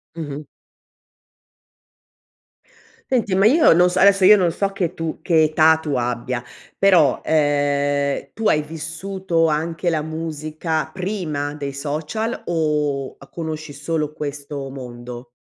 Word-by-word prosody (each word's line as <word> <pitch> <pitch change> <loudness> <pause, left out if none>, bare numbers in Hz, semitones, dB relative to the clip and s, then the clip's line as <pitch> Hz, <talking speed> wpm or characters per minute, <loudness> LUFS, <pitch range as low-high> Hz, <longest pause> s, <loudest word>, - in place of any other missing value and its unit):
Mh-mh. 150 -2 -6 2.6
Senti 230 -7 +1
ma 195 +2 +4
io 295 +9 +6
non 180 +2 +5
so 180 - -1
adesso 195 -1 +5
io 210 +3 +9
non 180 -4 +2
so 195 +3 -2
che 180 -4 -2
tu 165 -2 -4
che 165 -3 +3
età 155 +1 +4
tu 155 -3 -3
abbia 120 0 -2 0.3
però, 175 -9 +4
ehm, 145 -2 +1
tu 225 0 0
hai 150 - +3
vissuto 165 +3 -2
anche 165 +3 -1
la 160 -2 0
musica 155 0 -3
prima 175 -7 -3
dei 140 -2 -4
social 155 - -3
o 150 -5 -1
a - - -16
conosci 155 -2 -5
solo 150 +1 -2
questo 145 -2 -6
mondo? 125 -2 -9
155 Hz, 130 wpm, -21 LUFS, 145-175 Hz, 2.6 s, io